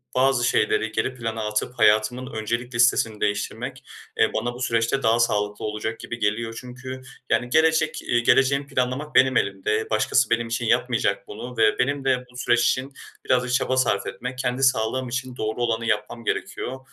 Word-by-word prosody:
bazı 130 -1 +3
şeyleri 110 +1 +1
geri 110 +4 -1
plana 115 -3 -4
atıp 115 +4 -3
hayatımın 110 +5 +2
öncelik 115 +3 -3
listesini 115 -2 +2
değiştirmek, 115 +5 -3 0.4
eee, - - +3
bana 120 +2 -2
bu 125 - -10
süreçte 115 +3 0
daha 115 +1 +3
sağlıklı 105 -3 0
olacak 110 +1 -4
gibi 120 - -6
geliyor. 110 +2 -1
Çünkü, 130 +1 -8 0.3
yani, 120 +2 +1
gelecek 160 +1 +2
eee, 120 - +1
geleceğimi 135 +3 +3
planlamak 135 +2 -2
benim 130 -1 +5
elimde. 105 +3 -1
Başkası 110 +3 +2
benim 115 0 +1
için 120 +1 -2
yapmayacak 120 -4 +1
bunu 125 +4 -8
ve 110 -1 +3
benim 135 +2 0
de 130 -1 +1
bu 125 - -13
süreç 120 -1 +2
için 135 +2 -1 0.3
biraz 125 -1 +2
da 125 - -5
çaba 130 0 +1
sarf 110 -6 +1
etmek, 125 +1 -6
kendi 125 +1 -1
sağlığım 130 0 +1
için 130 0 -4
doğru 110 +2 -3
olanı 115 -1 0
yapmam 105 +2 -2
gerekiyor. 130 +4 -3
120 Hz, 175 wpm, -24 LUFS, 110-130 Hz, 0.4 s, benim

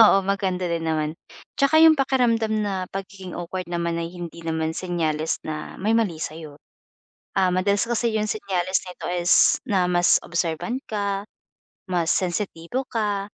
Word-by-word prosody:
Oo, 215 -3 +8
maganda 190 -2 0
din 165 -1 -1
naman, 155 -1 0 0.5
'tsaka 315 +3 +5
'yung 320 -2 +7
pakiramdam 240 -5 +2
na 190 -3 -2
pagiging 195 -1 -7
awkward 180 +1 -5
naman 170 -1 -1
ay 165 0 -2
hindi 170 -1 -7
naman 160 -1 0
senyales 160 -3 -1
na 155 -1 -5
may 210 - 0
mali 200 -8 0
sa'yo, 155 -1 -6 0.8
ah, 185 -1 +4
madalas 200 +3 +2
kasi 235 -1 0
'yung 215 0 0
senyales 190 -3 0
nito 180 - -7
is, 175 0 +4
na 190 -4 +2
mas 175 0 +4
observant 170 +8 -1
ka, 200 -1 -2 0.6
mas 170 -2 +1
sensitibo 185 +5 -2
ka, 205 -3 -1
185 Hz, 150 wpm, -24 LUFS, 170-210 Hz, 0.8 s, Oo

